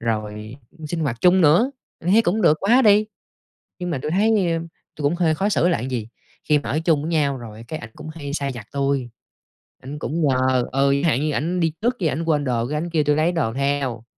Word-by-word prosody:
rồi 110 0 -4 0.3
sinh 165 +2 -3
hoạt 125 -7 -2
chung 180 +1 +5
nữa, 175 - +4 0.3
thấy 195 +7 +3
cũng 215 +2 0
được 155 -3 +5
quá 240 +7 +4
đi! 210 -1 +5 0.7
Nhưng 180 0 -4
mà 155 - -1
tui - - -3
thấy 200 +6 +2 0.7
tui 150 - -7
cũng 145 +4 +2
hơi 165 -3 +2
khó 195 +6 0
xử 180 -4 +2
là 170 - +1
gì? 120 -3 -4 0.4
Khi 150 -1 +4
mà 145 - -5
ở 150 - 0
chung 160 -4 +2
với 160 - -3
nhau 145 -4 +1
rồi 115 -1 -10
cái 155 - -4
ảnh 110 - -10
cũng 155 0 -10
hay 155 -3 -7
sai 140 -2 -2
vặt 115 -4 -9
tui, 140 -3 -1 0.7
ảnh 140 +3 -7
cũng 165 +3 -3
nhờ 130 -1 +2
ừ, 140 +1 +3
chẳng - - -2
hạn 125 +1 +1
như 155 - 0
ảnh 175 +5 -1
đi 165 -2 +1
trước 245 +2 +1
cái 170 - +1
ảnh 160 - -3
quên 150 -3 +1
đồ, 120 -3 0
cái 150 - -2
ảnh 170 +3 -4
kêu 160 -3 +1
tui 145 0 +2
lấy 160 +3 +2
đồ 155 -10 -1
theo. 135 -4 -1
150 Hz, 235 wpm, -22 LUFS, 130-170 Hz, 0.7 s, chung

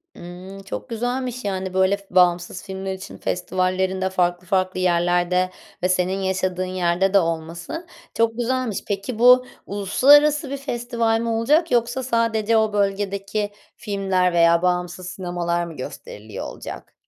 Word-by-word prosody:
Imm, 180 +3 -10
çok 195 - -6
güzelmiş. 245 +1 -3
Yani, 190 -2 -3
böyle, 190 +1 +3
f 200 - -20
bağımsız 180 0 +3
filmler 190 0 -5
için 190 0 -9
festivallerinde 185 +1 -1
farklı 180 -1 0
farklı 185 0 0
yerlerde 175 +1 +2 0.3
ve 180 - +2
senin 185 +1 +1
yaşadığın 185 -1 -1
yerde 185 +1 0
de 200 - +7
olması 165 - -4 0.3
çok 230 0 +1
güzelmiş. 245 -3 -1
Peki, 205 +3 -3
bu 250 +1 +7 0.2
uluslararası 285 +9 +4
bir 280 - -3
festival 235 -4 -1
mi 235 - -2
olacak 290 +9 +2
yoksa 240 +2 +1
sadece 230 -2 +1
o 220 -1 +2
bölgedeki 200 +1 -1 0.3
filmler 195 -4 0
veya 170 0 +4
bağımsız 180 0 -1
sinemalar 175 -2 -2
mı 165 -2 -9
gösteriliyor 110 -4 -8
olacak? - - -9
190 Hz, 135 wpm, -22 LUFS, 180-230 Hz, 0.3 s, de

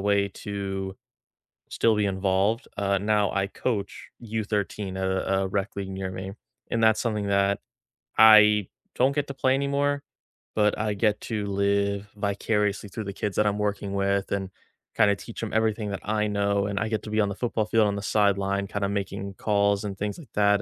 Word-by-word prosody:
way 100 0 +2
to 95 -1 -5 0.7
still 115 -1 +2
be 105 -1 +1
involved, 95 +4 +1
uh, 100 -1 +1
now 105 0 +2
I 100 0 0
coach 100 -1 -3
U13 105 -3 -2
a 95 0 0
a - - -1
rec 100 +1 -2
league 100 -1 -4
near 95 0 -4
me. 95 +1 -6 0.4
And 115 - +1
that's 110 0 +5
something 105 -4 -1
that 100 0 +2 0.6
I 105 -2 +7 0.3
don't 135 +2 +2
get 145 -1 0
to 140 - -5
play 130 0 +2
anymore, 140 +1 0 0.5
but 105 -1 +2
I 105 -1 0
get 105 +1 +1
to 105 -3 -3
live 100 0 0
vicariously 105 0 -1
through 105 +2 -6
the 100 - -5
kids 100 0 -3
that 105 - +3
I'm 105 0 0
working 100 -1 -2
with 100 0 0
and 95 -1 -1 0.5
kinda 100 -1 +4
teach 115 +3 -9
'em 110 - -4
everything 110 -1 +1
that 100 - -4
I 105 0 +1
know 100 -1 +1
and 100 -1 -2
I 110 - -1
get 110 -1 -1
to 105 - -7
be 110 - +1
on 100 - +1
the 100 - -4
football 115 -2 -1
field 110 -1 +3
on 100 - -1
the 100 - -4
sideline 100 -1 +1
kinda 100 0 -2
making 100 0 -3
calls 100 0 +1
and 100 -2 -5
things 105 +6 -3
like 140 -10 -14
that 100 0 +4
100 Hz, 190 wpm, -26 LUFS, 100-105 Hz, 0.7 s, I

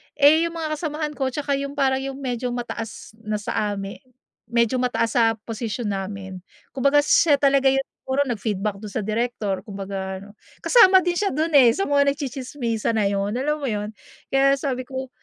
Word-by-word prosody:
Eh, 310 +3 +5
yung 335 - -8
mga 310 -1 -2
kasamahan 300 -1 -3
ko 265 -2 -1
'tsaka 285 +1 -2
yung 280 +1 -5
parang 265 -1 +2
yung 270 0 -5
medyo 250 -2 -3
mataas 230 -2 -6
na 215 -1 -3
sa 205 0 -2
ami 195 0 -6 0.5
medyo 235 +1 +1
mataas 245 -2 0
na 225 -1 +4
sa 220 - -17
posisyon 225 0 -4
namin. 195 -1 -5 0.3
Kumbaga, 280 +2 +3
siya 305 +1 +4
talaga 275 -1 +3
yung 270 0 +4
siguro 270 0 -3
nag-feedback 210 -2 -2
dun 205 0 -9
sa - - -1
direktor. 215 -2 -2
Kumbaga 195 -1 -5
ano, 205 +1 -14 0.2
kasama 380 -6 +6
din 350 0 -1
siya 400 -8 0
dun 315 +3 0
eh, 240 -4 +7
sa 390 - -1
nagtsitsismisan 275 -5 -1
na 210 - +2
'yun. 200 +1 -1
Alam 295 +5 -1
mo 275 - -2
'yun? 210 -1 -3 0.4
Kaya 275 0 +4
sabi 255 -2 -3
ko, 260 0 -6
250 Hz, 180 wpm, -23 LUFS, 215-280 Hz, 0.5 s, eh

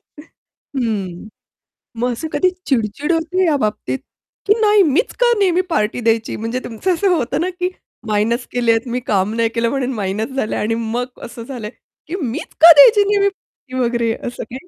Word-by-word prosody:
हं. - - -61 1.8
मग 245 +2 -1
असं 245 +7 -4
कधी 370 - +3 0.2
चिड-चिड 255 +4 0
होते 340 +3 +1
या 320 -3 +2
बाबतीत 215 +5 -2 0.5
की 415 - +5
"नाही 420 -2 +5
मीच 320 - +1
का - - +4
नेहमी 365 -2 +3
पार्टी 215 -6 0
द्यायची?" 225 -1 0
म्हणजे 230 +3 -3
तुमचं 245 - -1
असं 385 +3 +1
होतं 275 -2 -1
ना, 360 - 0
की 360 0 -2 0.4
मायनस 220 +3 0
केलेत, 235 0 +1
मी 245 +1 -2
काम 200 0 +1
नाही 230 0 +1
केलं 230 0 +1
म्हणून 265 -1 -2
मायनस 210 +1 -2
झालंय 220 -5 -1
आणि 225 +2 0
मग 245 +3 -4
असं 230 0 -9
झालंय, 235 -4 -6 0.4
की 330 - -4
"मीच 245 -4 -5
का 335 +1 +11
द्यायची 410 +8 +7
नेहमी 400 -1 +3
पार्टी 265 -8 -11
वगैरे," 235 -1 0
असं 245 - -5
काही. 260 +9 -10
250 Hz, 175 wpm, -18 LUFS, 230-340 Hz, 1.8 s, का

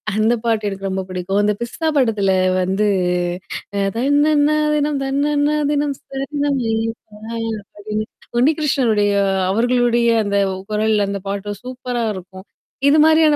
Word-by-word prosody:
அந்த 215 +2 +3
பாட்டு 225 -2 0
எனக்கு 195 0 -5
ரொம்ப 190 0 -2
பிடிக்கும். 185 +2 -1
அந்த 210 0 +2
பிஸ்தா 240 +7 -3
படத்தில 215 -7 +2 0.3
வந்து 190 +3 +1 0.9
அ - - +1 0.2
தன்னன்னா 290 +3 +3 0.2
தினம் 295 -1 0
தன்னன்னா 290 +2 +1 0.2
தினம் 290 -1 0
சரணம் 280 +1 -2
ஐயப்பா 225 -1 -4 0.6
அப்படின்னு 210 +1 -4 0.3
உண்ணி 285 +6 +4
கிருஷ்ணனுடைய 235 -9 +2 0.4
அவர்களுடைய 240 +2 +2 0.2
அந்த 200 0 0 0.3
குரல் 215 +1 +2
அந்த 200 -1 -4
பாட்டும் 200 0 -4
சூப்பரா 250 -1 -4
இருக்கும். 190 +1 -10 0.4
இது 295 - +5
மாரியான 315 -1 +5
235 Hz, 125 wpm, -19 LUFS, 205-285 Hz, 0.9 s, இது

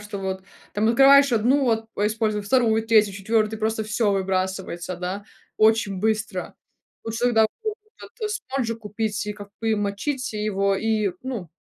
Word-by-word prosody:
что 210 -1 -7
вот 190 -1 -4 0.3
там 215 +2 +1
открываешь 275 +3 +6
1, 250 +5 +3
вот, 225 -2 +1
а 205 - +1
используй 215 -1 0
2, 225 0 +2
3, 215 -2 +4
4, 215 +2 0
просто 220 0 0
всё 215 0 +1
выбрасывается, 185 -2 -2
да, 185 +3 -4 0.3
очень 215 -3 +3
быстро. 215 -2 -2 0.5
Лучше 225 +2 -3
тогда 225 -3 +4 0.2
вот 435 -1 -1 0.5
этот 425 -1 -2
спонжик 260 - -3
купить, 210 0 -3
и 210 - -2
как 205 -1 -11
бы 225 -1 +1
мочить 225 +6 -2
его 200 -2 0
и, 215 -1 0
ну, 245 -9 -5
215 Hz, 155 wpm, -24 LUFS, 200-230 Hz, 0.5 s, открываешь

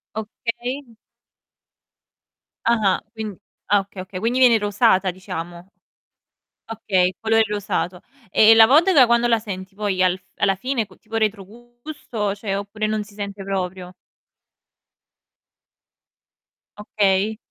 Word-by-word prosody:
Okay. 240 +5 -5 1.8
Ah-ah. 215 -5 +2 0.2
Quind 215 -4 -6 0.3
ah 205 -1 +4
okay, 195 -1 -10
okay. 185 0 -7
Quindi 235 +5 0
viene 245 -3 +6
rosata, 205 -2 +2
diciamo. 175 -1 -8 1.0
Okay, 200 -5 +1
il 185 - -5
colore 225 0 +2
rosato. 200 -3 -3 0.3
E 220 +1 +6
la 225 0 +8
vodka 300 +2 +5
quando 235 0 +2
la 230 -1 +3
senti 190 -3 -7
poi 200 -2 -1
al 185 0 +2
f - - -29
alla 195 -1 +1
fine 245 +3 -2
co 190 -2 -20
tipo 225 0 -10
retrogusto, 225 +1 -4
cioè, 200 -1 -3
oppure 205 +2 -4
non 215 0 -1
si 205 - -17
sente 200 -1 -6
proprio? 185 -2 -4 2.9
Okay. 205 0 0
210 Hz, 120 wpm, -21 LUFS, 190-225 Hz, 2.9 s, la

